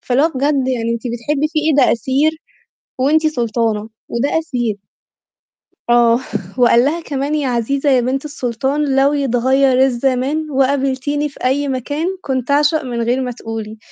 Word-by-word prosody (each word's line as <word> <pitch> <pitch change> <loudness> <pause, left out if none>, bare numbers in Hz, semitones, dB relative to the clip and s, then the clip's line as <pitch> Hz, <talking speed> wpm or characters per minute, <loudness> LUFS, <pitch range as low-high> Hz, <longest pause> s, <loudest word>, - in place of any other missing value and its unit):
فاللي 255 +2 +1
هو 320 - +4
بجد 275 0 +1
يعني 230 -3 -1
أنتِ 230 - -6
بتحبِّي 275 +6 -1
فيه 310 - +1
إيه - - +2
ده - - +3
أسير 270 +7 +1 0.7
وأنتِ 310 +4 +3
سُلطانة 230 -5 -1 0.2
وده 280 +7 0
أسير. 240 -9 -2 1.1
آه، 240 0 +4 0.4
وقال 240 -1 +5
لها 320 +4 0
كمان 285 0 -2
"يا 290 -3 -1
عزيزة 265 +4 0
يا 260 -2 +4
بنت 265 +4 -2
السُلطان 270 +1 -1
لو 275 +2 +3
يتغيّر 265 0 +2
الزمان 270 +4 -1
وقابلتيني 275 +2 0
في 275 - -14
أي 280 +2 +1
مكان، 285 +5 -2
كنت 260 -3 -2
أعشق 295 +2 +2
من 240 -2 -3
غير 245 +3 0
ما 250 -1 -3
تقولي" 225 -2 -7
265 Hz, 155 wpm, -17 LUFS, 240-290 Hz, 1.1 s, وقال